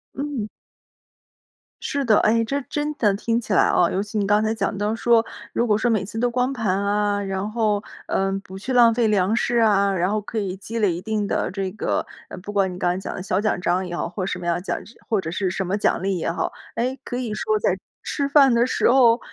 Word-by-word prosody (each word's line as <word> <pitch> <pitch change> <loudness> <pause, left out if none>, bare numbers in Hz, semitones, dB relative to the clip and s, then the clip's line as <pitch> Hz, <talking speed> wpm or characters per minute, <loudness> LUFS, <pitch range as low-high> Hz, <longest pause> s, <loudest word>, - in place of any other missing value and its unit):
嗯。 275 -6 -3 1.3
是 280 -1 -2
的， 215 -3 +5
哎， 230 +1 +3
这 280 +5 -2
真 295 0 -2
的 210 -8 +2
听 230 +3 0
起 220 - -3
来 - - +5
啊 170 - +3
尤 190 - 0
其 210 +2 -5
你 205 - +1
刚 210 +2 +3
才 220 0 +1
讲 200 -2 -2
到 210 +2 0
说， 230 0 +3 0.3
如 240 - 0
果 210 -2 +3
说 235 +2 +1
每 215 -3 +1
次 210 - -8
都 245 +1 +2
光 250 +2 0
盘 215 -7 0
啊， 205 0 +1
然 195 +1 -3
后， 215 -2 0 0.2
呃， 195 0 0
不 190 0 -10
去 210 +7 -5
浪 235 -2 +6
费 230 0 +2
粮 205 0 +2
食 240 0 +1
啊， 200 -3 +4
然 180 0 +1
后 210 +1 0
可 215 +2 -7
以 190 -3 -3
积 225 +4 -5
累 205 -5 +2
一 170 - -5
定 215 0 -2
的 185 - -1
这 190 -1 -3
个， 215 - -1 0.2
呃， - - -8
不 205 +3 -8
管 195 -2 +1
你 - - -8
刚 180 -1 +1
才 - - -4
讲 190 - -5
的 - - -5
小 190 +1 0
奖 215 -4 0
章 180 +1 0
也 175 -1 -5
好， - - -2
或 185 +2 -4
什 180 - -3
么 175 - -7
样 170 -1 +1
的 175 - -4
奖 185 - -2 0.3
或 220 -3 +2
者 160 - -4
是 185 +1 -1
什 190 +1 -2
么 195 +3 0
奖 205 - +1
励 190 0 0
也 165 - -1
好。 170 - -2 0.2
哎， 255 +3 -1
可 245 - -4
以 245 -4 -3
说 430 - 0
在 - - +1 0.2
吃 280 -2 -2
饭 275 -3 +6
的 235 +1 +4
时 255 - +2
候 240 -2 +5
210 Hz, 270 characters per minute, -23 LUFS, 190-235 Hz, 1.3 s, 浪